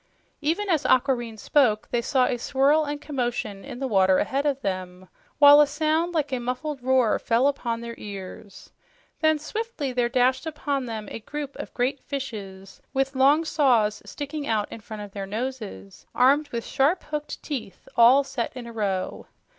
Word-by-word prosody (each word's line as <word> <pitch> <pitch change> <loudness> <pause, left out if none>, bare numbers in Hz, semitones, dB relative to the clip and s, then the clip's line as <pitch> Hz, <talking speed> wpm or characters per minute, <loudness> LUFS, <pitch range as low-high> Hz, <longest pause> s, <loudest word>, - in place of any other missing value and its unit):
Even 335 +8 0
as 325 -6 +1
Aquareine 245 -4 +2
spoke, 215 -1 +2
they 240 - +1
saw 255 +1 +2
a 245 - -1
swirl 285 +5 +3
and 290 0 -4
commotion 240 -8 -3
in 265 -3 -8
the 270 - -3
water 190 -4 +4
ahead 275 +6 0
of 275 -2 0
them, 185 -1 -4 0.3
while 290 0 +9
a 295 - +5
sound 315 +4 0
like 295 -4 0
a 255 - 0
muffled 255 +4 -4
roar 255 -3 +3
fell 235 +3 +2
upon 240 -5 -1
their 235 0 -6
ears. 200 -1 -9 0.5
Then 315 -1 +3
swiftly 310 - -4
there 245 -1 +1
dashed 255 +4 +2
upon 285 -4 -2
them 220 -2 -5
a - - -5
group 285 +4 -6
of - - -7
great 260 +2 0
fishes 200 -9 -7
with 270 +1 +1
long 285 +5 +4
saws 245 -9 +2
sticking 290 0 -6
out 215 -2 0
in - - -7
front 210 0 -8
of 205 - -10
their 195 -1 -6
noses, 215 - -6
armed 285 +4 +4
with 235 -1 -4
sharp, 300 +7 +1
hooked 300 -1 -5
teeth, 245 - -6
all 245 +4 +7
set 270 -3 -3
in 245 - -7
a 235 - -9
row. 195 -4 -2
260 Hz, 180 wpm, -25 LUFS, 220-290 Hz, 0.5 s, while